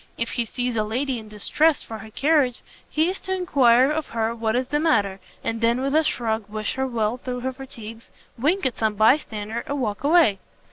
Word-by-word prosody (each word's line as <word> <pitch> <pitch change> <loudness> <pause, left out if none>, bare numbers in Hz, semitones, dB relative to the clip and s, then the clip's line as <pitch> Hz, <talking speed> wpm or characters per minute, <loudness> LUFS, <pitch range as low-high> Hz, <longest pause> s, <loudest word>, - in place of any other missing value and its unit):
If 230 - -2
he 235 - -1
sees 245 +1 -3
a 215 - +1
lady 250 +4 -2
in 220 - -11
distress 285 +9 +1
for 220 -1 -8
her 220 - -10
carriage, 275 0 +1 0.3
he 315 +2 +2
is 385 - -8
to 380 0 -2
enquire 265 -7 +4
of 310 0 -2
her 225 0 -1
what 225 -1 -1
is 255 +1 -1
the 295 - +1
matter, 205 -12 +1 0.2
and 230 0 -2
then, 235 +2 +2
with 275 +1 -1
a 315 +1 +4
shrug, 220 -6 -2
wish 215 0 -3
her 265 0 -1
well 230 -1 -1
through 250 -1 -5
her 260 +1 -2
fatigues, 230 -4 -10 0.3
wink 305 +9 0
at 255 - -1
some 220 -1 +1
bye 220 +7 +6
stander, 220 -4 -5
and 285 0 -2
walk 210 -3 -2
away. 295 - +4
245 Hz, 220 wpm, -23 LUFS, 220-280 Hz, 0.3 s, bye